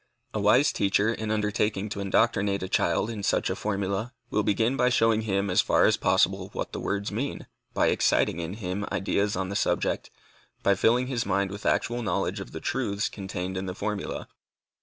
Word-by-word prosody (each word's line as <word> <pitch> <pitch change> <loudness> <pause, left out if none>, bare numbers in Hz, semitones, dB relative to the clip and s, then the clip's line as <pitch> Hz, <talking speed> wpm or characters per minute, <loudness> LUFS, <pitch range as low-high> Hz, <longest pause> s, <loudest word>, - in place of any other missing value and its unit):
A 110 - -1
wise 105 +8 +4
teacher, 100 +3 +2
in 110 -1 -4
undertaking 105 -1 0
to 100 - -5
indoctrinate 100 0 +1
a - - -3
child 105 - +1
in 110 -3 -5
such - - +1
a - - -1
formula, 100 +3 -2 0.2
will 105 - +2
begin 115 +5 +1
by 125 -1 +3
showing 115 -3 +3
him 100 -2 0
as 90 - +5
far - - +3
as - - +4
possible - - +2
what - - -4
the - - -3
words 100 +1 -2
mean, 125 +7 -3 0.3
by - - +3
exciting 85 - +2
in 85 +3 -4
him 100 -1 -3
ideas 100 +1 0
on 95 0 -2
the 100 - -4
subject, - - 0 0.5
by 100 - +4
filling 120 +6 +3
his 125 -3 -1
mind 100 -1 0
with 100 +1 -5
actual 120 +1 +1
knowledge 110 - -1
of - - -8
the - - -6
truths 115 -2 -1
contained 95 -2 -5
in 95 +1 -3
the 90 - -4
formula. 105 0 -4
100 Hz, 195 wpm, -27 LUFS, 100-110 Hz, 0.5 s, as